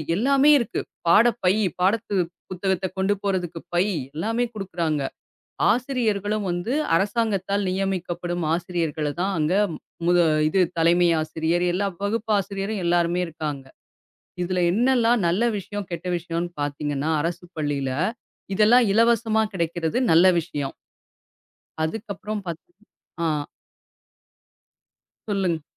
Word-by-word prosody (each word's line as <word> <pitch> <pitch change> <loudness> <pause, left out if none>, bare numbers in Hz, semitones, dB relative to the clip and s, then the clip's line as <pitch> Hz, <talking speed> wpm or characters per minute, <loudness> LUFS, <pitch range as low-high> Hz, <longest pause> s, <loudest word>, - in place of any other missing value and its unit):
எல்லாமே 275 +6 +4
இருக்கு. 235 - -2 0.3
பாடப்பை, 210 0 +4 0.3
பாடப்புத்தகத்த 190 -2 -1
கொண்டு 190 +2 +2
போறதுக்கு 180 -4 -2 0.2
பை 180 +3 +4 0.3
எல்லாமே 225 +8 0
குடுக்குறாங்க. 170 -7 -2 0.7
ஆசிரியர்களும் 215 -5 0
வந்து 175 +8 -2 0.2
அரசாங்கத்தால் 200 -1 0
நியமிக்கப்படும் 175 -2 -2
ஆசிரியர்கள 165 -4 -2
தான் 195 +1 0
அங்க 155 +3 +1 0.5
முத 175 0 +4 0.3
இது 190 +4 +1 0.2
தலைமை 170 +1 +4
ஆசிரியர் 160 +3 -1
எல்லா 200 +3 0 0.2
வகுப்பு 220 +1 -2
ஆசிரியரும் 195 +1 -3
எல்லாருமே 175 +1 +2
இருக்காங்க. 150 -4 -5 0.8
இதுல 180 0 -1
என்னெல்லாம் 240 0 +3
நல்ல 185 +7 +1 0.2
விஷியம் 205 0 -6
கெட்ட 170 +2 -5
விஷியம்னு 170 0 -3
பாத்தீங்கன்னா 145 +1 -2
அரசுப் 175 +2 -5
பள்ளியில 140 -3 -1 0.6
இதெல்லாம் 230 +4 +5
இலவசமா 225 -1 +3
கிடைக்கிறது 170 +3 -1
நல்ல 170 +3 +6
விஷியம். 145 -4 -5 1.1
அதுக்கப்பறம் 210 +2 -4
பாத் 165 -1 -4 0.6
அ. 150 -2 0 1.8
சொல்லுங்க. 185 -6 0
185 Hz, 100 wpm, -24 LUFS, 170-210 Hz, 1.8 s, நல்ல